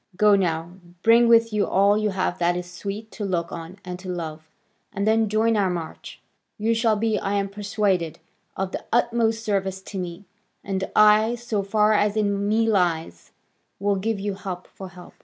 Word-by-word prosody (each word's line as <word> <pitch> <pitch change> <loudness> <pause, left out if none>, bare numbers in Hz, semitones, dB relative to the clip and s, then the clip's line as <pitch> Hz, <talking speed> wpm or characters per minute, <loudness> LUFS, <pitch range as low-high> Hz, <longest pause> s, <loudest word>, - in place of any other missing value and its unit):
Go 210 +2 +5
now, 170 -1 -1 0.3
bring 230 +1 +6
with 230 -1 +4
you 210 -1 +1
all 200 +2 +4
you 215 0 +1
have 185 -2 -2
that 175 0 +2
is 180 0 -6
sweet 205 +4 -6
to 215 - -6
look 175 -4 -2
on 170 +3 -8
and 180 0 -6
to 185 0 -8
love, 160 -3 -6 0.4
and 200 -2 -2
then 220 0 +2
join 220 +2 +2
our 200 -3 +2
march: 170 -3 -6 0.4
you 225 +1 +1
shall 225 -1 +2
be, 215 -1 0
I 200 +1 -2
am 200 0 0
persuaded, 200 -4 -1 0.4
of 190 -1 -2
the - - -5
utmost 230 -1 +1
service 195 -3 -1
to 195 -1 -6
me, 180 +2 -6 0.4
and 190 -1 -3
I, 215 +2 +5
so 235 -3 -2
far 210 +2 +2
as 210 0 +2
in 200 -1 0
me 225 +1 +2
lies, 165 - 0 0.5
will 200 +1 +1
give 205 +2 -2
you 200 0 -2
help 185 -2 -6
for 190 -1 -10
help." 180 -1 -14
200 Hz, 190 wpm, -24 LUFS, 185-215 Hz, 0.5 s, bring